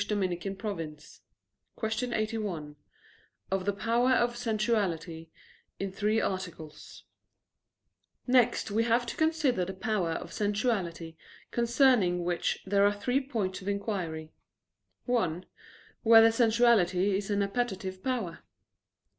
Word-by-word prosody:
_______________________ 185 Hz, -5 st, -4 dB, 0.6 s
QUESTION 225 Hz, +2 st, -2 dB
81 210 Hz, -9 st, -3 dB, 0.8 s
OF 190 Hz, -1 st, -1 dB
THE 205 Hz, -, +1 dB
POWER 235 Hz, +5 st, +2 dB
OF 240 Hz, -1 st, +2 dB
SENSUALITY 205 Hz, -9 st, -1 dB, 0.5 s
(In 195 Hz, -1 st, -3 dB
Three 210 Hz, +3 st, +1 dB
Articles) 170 Hz, -7 st, -5 dB, 1.2 s
Next 245 Hz, -4 st, +2 dB
we 220 Hz, +3 st, +2 dB
have 235 Hz, +1 st, +2 dB
to 235 Hz, -, -5 dB
consider 310 Hz, -, +1 dB
the 190 Hz, +2 st, -5 dB
power 190 Hz, -4 st, -1 dB
of -, -, -6 dB
sensuality, 200 Hz, -6 st, -1 dB, 0.3 s
concerning 235 Hz, -7 st, +3 dB
which 175 Hz, 0 st, -1 dB
there 200 Hz, +1 st, +3 dB
are 205 Hz, 0 st, +3 dB
three 250 Hz, +6 st, +1 dB
points 215 Hz, -9 st, -3 dB
of 190 Hz, -, -10 dB
inquiry: 185 Hz, -6 st, -3 dB, 0.7 s
(1) 185 Hz, -9 st, 0 dB, 0.6 s
Whether 225 Hz, 0 st, +7 dB
sensuality 220 Hz, -5 st, +3 dB
is 195 Hz, +1 st, -3 dB
only 205 Hz, -1 st, +1 dB
an 200 Hz, -, -3 dB
appetitive 190 Hz, -5 st, -3 dB
power? 235 Hz, -10 st, -2 dB
205 Hz, 115 wpm, -29 LUFS, 180-235 Hz, 1.2 s, Whether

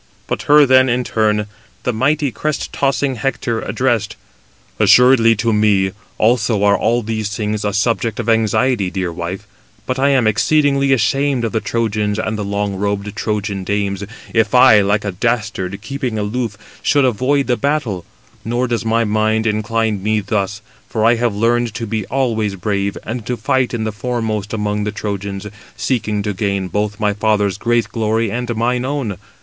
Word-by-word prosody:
But -, -, -3 dB
her 150 Hz, 0 st, +7 dB
then 130 Hz, 0 st, +5 dB
in 125 Hz, +1 st, +1 dB
turn 105 Hz, -2 st, +1 dB, 0.4 s
the 125 Hz, -, 0 dB
mighty 140 Hz, +4 st, +1 dB
crest 155 Hz, +5 st, -3 dB
tossing 135 Hz, -1 st, 0 dB
Hector 115 Hz, -2 st, -2 dB
addressed: 115 Hz, -1 st, -1 dB, 0.6 s
"Assuredly 125 Hz, -2 st, +6 dB
to 115 Hz, +2 st, 0 dB
me 105 Hz, -3 st, +3 dB, 0.3 s
also 110 Hz, -2 st, +2 dB
are 100 Hz, 0 st, +5 dB
all 120 Hz, +3 st, +1 dB
these 110 Hz, -1 st, -2 dB
things 105 Hz, 0 st, -2 dB
a 105 Hz, -, 0 dB
subject 115 Hz, +2 st, 0 dB
of 120 Hz, -, -3 dB
anxiety, 115 Hz, -1 st, +2 dB
dear 90 Hz, -2 st, -3 dB
wife, 90 Hz, +4 st, -5 dB, 0.4 s
but 130 Hz, 0 st, -2 dB
I 140 Hz, +1 st, +3 dB
am 135 Hz, -4 st, +3 dB
exceedingly 140 Hz, +5 st, +2 dB
ashamed 135 Hz, +1 st, +1 dB
of 115 Hz, -, -2 dB
the 110 Hz, -, 0 dB
Trojans 105 Hz, -2 st, -1 dB
and 110 Hz, 0 st, -2 dB
the 105 Hz, -, -3 dB
long 100 Hz, 0 st, -2 dB
robed 100 Hz, +1 st, -2 dB
Trojan 105 Hz, -3 st, -2 dB
dames, 100 Hz, 0 st, -2 dB, 0.3 s
if 110 Hz, +1 st, +2 dB
I, 125 Hz, -4 st, +7 dB
like 105 Hz, +1 st, +1 dB
a 100 Hz, -, -1 dB
dastard, 105 Hz, -2 st, -2 dB
[keeping] 135 Hz, -4 st, -3 dB
aloof, 105 Hz, 0 st, -2 dB, 0.2 s
should 145 Hz, -1 st, +3 dB
avoid 130 Hz, +4 st, +1 dB
the 125 Hz, -, +1 dB
battle: 125 Hz, -, -1 dB, 0.4 s
nor 120 Hz, +3 st, -1 dB
does 120 Hz, -1 st, -1 dB
my 115 Hz, +1 st, +1 dB
mind 110 Hz, +1 st, +1 dB
incline 110 Hz, -1 st, 0 dB
me 110 Hz, +2 st, +1 dB
thus, 100 Hz, 0 st, -2 dB, 0.3 s
for 110 Hz, -1 st, 0 dB
I 115 Hz, -, +6 dB
have 115 Hz, -3 st, 0 dB
learned 115 Hz, +1 st, +1 dB
to 115 Hz, 0 st, -3 dB
be 110 Hz, -2 st, -3 dB
always 115 Hz, -6 st, 0 dB
brave, 100 Hz, +1 st, -2 dB
and 115 Hz, +1 st, -5 dB
to 125 Hz, -, -2 dB
fight 130 Hz, 0 st, 0 dB
in 120 Hz, -2 st, -2 dB
the 110 Hz, -, -2 dB
foremost 110 Hz, -2 st, -3 dB
among 105 Hz, -1 st, -1 dB
the 105 Hz, -, -2 dB
Trojans, 100 Hz, -1 st, -4 dB, 0.3 s
seeking 105 Hz, -5 st, -1 dB
to 105 Hz, 0 st, -2 dB
gain 100 Hz, -2 st, -2 dB
both 105 Hz, +1 st, -2 dB
my 105 Hz, -1 st, +1 dB
father's 105 Hz, -2 st, 0 dB
great 120 Hz, 0 st, +1 dB
glory 110 Hz, -1 st, 0 dB
and 120 Hz, 0 st, -3 dB
mine 120 Hz, +2 st, 0 dB
own. 130 Hz, -8 st, -3 dB
110 Hz, 175 wpm, -18 LUFS, 105-120 Hz, 0.6 s, her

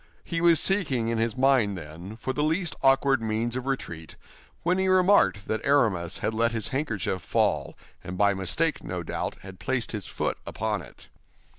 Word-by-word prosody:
He 165 Hz, -1 st, -3 dB
was 170 Hz, -2 st, +6 dB
seeking 135 Hz, -, +2 dB
in 115 Hz, -1 st, -1 dB
his 115 Hz, +2 st, -1 dB
mind, 130 Hz, -7 st, +3 dB
then, 85 Hz, +6 st, -9 dB
for 130 Hz, +3 st, -3 dB
the 150 Hz, -, -1 dB
least 165 Hz, +3 st, 0 dB
awkward 135 Hz, -1 st, +4 dB
means 115 Hz, +2 st, -1 dB
of 130 Hz, +1 st, -4 dB
retreat, 85 Hz, -12 st, -4 dB, 0.5 s
when 180 Hz, +2 st, +1 dB
he 190 Hz, -, +1 dB
remarked 185 Hz, -, +4 dB
that 110 Hz, 0 st, -2 dB
Aramis 105 Hz, -, +2 dB
had 110 Hz, -, 0 dB
let 115 Hz, +1 st, +1 dB
his 110 Hz, -3 st, -1 dB
handkerchief 110 Hz, -9 st, -2 dB
fall, -, -, 0 dB, 0.3 s
and 90 Hz, 0 st, -6 dB
by 100 Hz, 0 st, +4 dB
mistake, 100 Hz, -, 0 dB
no 90 Hz, -1 st, -4 dB
doubt, -, -, -4 dB
had 95 Hz, -1 st, -11 dB
placed 130 Hz, -3 st, -1 dB
his 105 Hz, -4 st, -5 dB
foot -, -, -3 dB
upon -, -, -2 dB
it. -, -, -15 dB
115 Hz, 180 wpm, -26 LUFS, 100-145 Hz, 0.5 s, was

